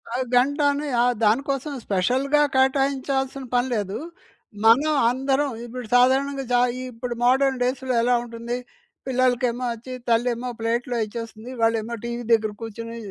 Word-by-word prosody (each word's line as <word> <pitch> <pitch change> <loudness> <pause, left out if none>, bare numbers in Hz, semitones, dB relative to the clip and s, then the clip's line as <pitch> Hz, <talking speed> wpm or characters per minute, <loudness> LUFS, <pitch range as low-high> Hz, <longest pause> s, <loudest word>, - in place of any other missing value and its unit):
ఆహ్, 255 +1 -1
గంటని 285 +2 +2 0.2
ఆహ్, 245 0 +2
దాని 220 +6 +3
కోసం 275 +2 -2
స్పెషల్‌గా 260 +10 +2
కేటాయించాల్సిన 270 0 +1
పని 245 +1 +2
లేదు. 205 -2 -2 0.7
మనం 280 +7 +5 0.2
అందరం 270 +2 0 0.2
ఇప్పుడు 240 -1 -7
సాధారణంగా 270 +2 +3
చా 245 - +5 0.3
ఇప్పుడు 240 +1 -5
మోడర్‌న్ 265 0 +3
డేస్‌‌లో 255 +1 -1
ఎలా 245 +1 +3
ఉంటుంది, 235 +1 -5 0.5
పిల్లలకేమో 250 -1 +1
వచ్చి 240 +3 -9 0.2
తల్లి 230 +2 +3
ఏమో 250 +2 -5
ప్లేట్‌లో 240 +2 -1
ఇచ్చేస్తుంది. 230 +2 -8
వాళ్ళేమో 225 0 +1
టీవీ 235 0 -4
దగ్గర 220 -1 +2
కూర్చొని 230 +1 -7
250 Hz, 135 wpm, -23 LUFS, 230-270 Hz, 0.7 s, మనం